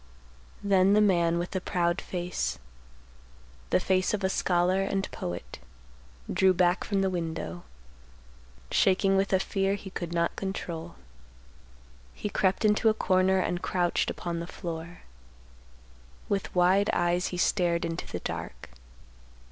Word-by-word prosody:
_ -, -, -2 dB
Then 195 Hz, 0 st, +5 dB
the 210 Hz, -, +5 dB
man 170 Hz, -5 st, +3 dB
with 175 Hz, +1 st, -3 dB
the 185 Hz, -, -2 dB
proud 175 Hz, 0 st, 0 dB
face, 180 Hz, -1 st, -3 dB, 1.1 s
the -, -, +3 dB
face 190 Hz, +2 st, +1 dB
of 200 Hz, -, -6 dB
a 190 Hz, -, +2 dB
scholar 180 Hz, 0 st, +2 dB
and 195 Hz, 0 st, -1 dB
poet, 85 Hz, -9 st, -6 dB, 0.7 s
drew 190 Hz, -1 st, +4 dB
back 180 Hz, 0 st, +2 dB
from 200 Hz, -2 st, 0 dB
the 190 Hz, -, +2 dB
window, 160 Hz, -, -4 dB, 1.1 s
shaking 195 Hz, 0 st, +3 dB
with 195 Hz, 0 st, +1 dB
a 190 Hz, -, +4 dB
fear 195 Hz, 0 st, 0 dB
he 195 Hz, -1 st, -9 dB
could 175 Hz, -2 st, -5 dB
not 170 Hz, 0 st, 0 dB
control. 175 Hz, -3 st, -5 dB, 1.2 s
He 210 Hz, -, -4 dB
crept 190 Hz, +3 st, +1 dB
into 215 Hz, +2 st, +4 dB
a 215 Hz, -, +1 dB
corner 190 Hz, -2 st, +2 dB
and 175 Hz, -1 st, -1 dB
crouched 175 Hz, -2 st, 0 dB
upon 170 Hz, -1 st, -4 dB
the 170 Hz, -, -5 dB
floor. 170 Hz, -1 st, -7 dB, 1.3 s
With 200 Hz, -2 st, -2 dB
wide 185 Hz, +3 st, +4 dB
eyes, 175 Hz, +1 st, +1 dB
he 180 Hz, -, -5 dB
stared 175 Hz, -2 st, +1 dB
into 165 Hz, 0 st, -4 dB
the -, -, -5 dB
dark. -, -, -6 dB
185 Hz, 140 wpm, -28 LUFS, 175-195 Hz, 1.3 s, Then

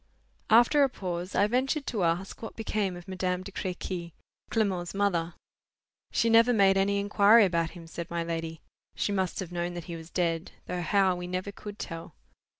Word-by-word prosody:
After 240 Hz, +6 st, +6 dB
a 275 Hz, -, +5 dB
pause, 180 Hz, -5 st, -5 dB
I 205 Hz, -, +4 dB
ventured 265 Hz, +6 st, 0 dB
to 215 Hz, -, -2 dB
ask 170 Hz, +3 st, -1 dB
what 225 Hz, -, -7 dB
became 210 Hz, -4 st, -1 dB
of 175 Hz, -, -12 dB
Madame 185 Hz, -1 st, -2 dB
de 200 Hz, -, -8 dB
Crequy, 180 Hz, -2 st, -4 dB, 0.4 s
Clement's 195 Hz, -5 st, -1 dB
mother. 175 Hz, -4 st, 0 dB, 0.8 s
"She 230 Hz, -, +2 dB
never 230 Hz, +2 st, +6 dB
made 195 Hz, -3 st, +5 dB
any 195 Hz, +1 st, +2 dB
inquiry 205 Hz, +2 st, +6 dB
about 170 Hz, -3 st, 0 dB
him," 170 Hz, -, -10 dB
said 165 Hz, 0 st, -7 dB
my 170 Hz, 0 st, -2 dB
lady. 165 Hz, -1 st, -4 dB, 0.3 s
"She -, -, -1 dB
must 190 Hz, -3 st, -1 dB
have 180 Hz, -2 st, -6 dB
known 175 Hz, 0 st, -3 dB
that 175 Hz, -, -5 dB
he 170 Hz, +1 st, -7 dB
was 165 Hz, 0 st, -9 dB
dead; 170 Hz, -2 st, -1 dB
though 180 Hz, -, -3 dB
how, 190 Hz, +1 st, +3 dB
we 180 Hz, 0 st, -5 dB
never 185 Hz, +2 st, -3 dB
could 205 Hz, 0 st, -9 dB
tell. 165 Hz, -4 st, -7 dB
185 Hz, 185 wpm, -28 LUFS, 170-205 Hz, 0.8 s, After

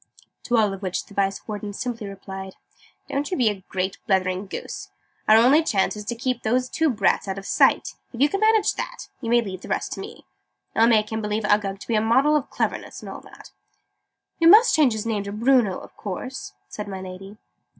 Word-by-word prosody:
To 240 Hz, -, +2 dB
all 210 Hz, -3 st, +3 dB
of 195 Hz, -, -8 dB
which 185 Hz, -2 st, -3 dB
the -, -, -16 dB
Vice 195 Hz, -1 st, -1 dB
Warden 210 Hz, -1 st, -5 dB
simply 230 Hz, -1 st, -4 dB
replied 190 Hz, -1 st, -8 dB, 0.5 s
"Don't 285 Hz, +1 st, -2 dB
you 365 Hz, -, -2 dB
be 245 Hz, -5 st, +4 dB
a 195 Hz, -3 st, -5 dB
great 190 Hz, +1 st, -2 dB
blethering 185 Hz, 0 st, +1 dB
goose! -, -, -6 dB, 0.4 s
Our 215 Hz, -, +7 dB
only 260 Hz, +7 st, +6 dB
chance 210 Hz, -13 st, +1 dB
is 210 Hz, -, -6 dB
to 235 Hz, -, -3 dB
keep 250 Hz, 0 st, -2 dB
those 250 Hz, +3 st, 0 dB
two 320 Hz, -1 st, +1 dB
brats 210 Hz, -4 st, +1 dB
out 190 Hz, 0 st, -3 dB
of 195 Hz, -, -7 dB
sight. -, -, +3 dB, 0.2 s
If 235 Hz, -, -9 dB
you 285 Hz, -, +5 dB
can 395 Hz, +6 st, -2 dB
manage 435 Hz, 0 st, +3 dB
that, -, -, -6 dB
you 230 Hz, -, -4 dB
may 240 Hz, 0 st, +4 dB
leave 190 Hz, -4 st, -6 dB
the -, -, -10 dB
rest -, -, -2 dB
to -, -, -7 dB
me. -, -, -9 dB, 0.5 s
I'll 225 Hz, +1 st, +5 dB
make 215 Hz, -2 st, +3 dB
him 220 Hz, 0 st, -2 dB
believe 210 Hz, +1 st, -2 dB
Uggug 205 Hz, -2 st, +1 dB
to -, -, -10 dB
be 235 Hz, -, -1 dB
a 215 Hz, -, +3 dB
model 265 Hz, +7 st, +3 dB
of 290 Hz, -3 st, 0 dB
cleverness -, -, -3 dB
and -, -, -7 dB
all -, -, -8 dB
that." -, -, -15 dB, 0.9 s
"We 330 Hz, -, +5 dB
must 435 Hz, +7 st, +8 dB
change 290 Hz, -7 st, +4 dB
his 220 Hz, 0 st, -4 dB
name 220 Hz, -3 st, -1 dB
to 200 Hz, 0 st, -6 dB
Bruno, 230 Hz, -2 st, +3 dB
of -, -, -13 dB
course?" 205 Hz, -, -6 dB
said 210 Hz, -1 st, -7 dB
my 190 Hz, -1 st, -5 dB
Lady. 190 Hz, +2 st, -9 dB
215 Hz, 225 wpm, -24 LUFS, 195-250 Hz, 0.9 s, must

